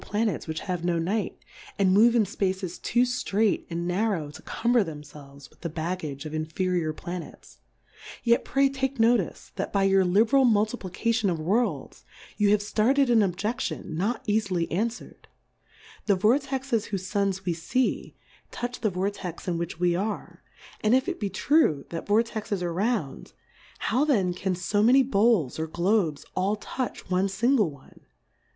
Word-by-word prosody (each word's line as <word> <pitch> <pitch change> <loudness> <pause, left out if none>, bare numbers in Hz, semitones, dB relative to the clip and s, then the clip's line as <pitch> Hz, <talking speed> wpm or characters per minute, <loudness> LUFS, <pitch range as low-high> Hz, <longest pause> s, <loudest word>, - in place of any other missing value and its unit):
147 - - -14 0.2
Planets 190 - -3
which 160 0 -3
have 180 -2 -3
no 175 -1 +1
Night, 195 +6 -1 0.4
and 190 -2 +3
move 230 +4 +5
in 225 -3 +4
Spaces 190 -2 -3
too 240 +1 +2
ftrait 225 -4 0
and 170 0 -3
narrow 180 -5 -1
to - - -12
cum 240 +1 -1
ber 240 -3 +5
themfelves 145 -3 -11
with - - -26
the 170 - -3
Baggage 160 -3 -4
of 155 - -6
in 155 0 -1
feriour 175 -1 -1
Planets: 155 - -8 0.6
Yet 235 0 +3
pray 275 +1 +2
take 270 0 -2
Notice^ 225 -4 +1
that 195 - -3
by 200 -1 +2
your 195 0 +4
Hberal 225 +9 +4
Multiplication 215 0 0
of 170 -3 -1
Worlds, 185 - -1 0.3
you 205 -1 +2
have 210 0 +4
ftarted 245 +6 +2
an 230 -2 +5
Ob|e£lion, 205 +4 -2
not 200 +11 -2
eafily 205 -6 0
anfwer'd: 225 +7 -3 0.8
The 200 -2 +4
Vortexes 260 +2 +1
whofe 195 -3 -2
Suns 195 0 -1
we 175 - +1
fee, 235 +10 -1 0.3
touch 245 0 -5
the 215 - +2
Vortex 190 -1 -4
in 170 -2 -1
which 170 0 -5
we 175 -1 +2
are; 205 +4 -4 0.4
and 215 +3 +4
if 260 +1 +1
it - - -3
be 205 - -2
true, 245 - +2
that 165 - -5
Vortexes 215 -2 0
are 170 -1 -2
round, 195 - -2 0.4
how 250 +6 +1
then 205 -12 +2
can 185 +1 -2
fo 200 +3 0
many 255 +5 +6
Bowls, 210 - +2
or 160 - -2
Globes 170 -2 0
all 190 +3 +1
touch 245 +3 -5
one 185 +2 +2
fmgle 215 +1 +2
one 140 -2 -16
200 Hz, 165 wpm, -26 LUFS, 175-230 Hz, 0.8 s, many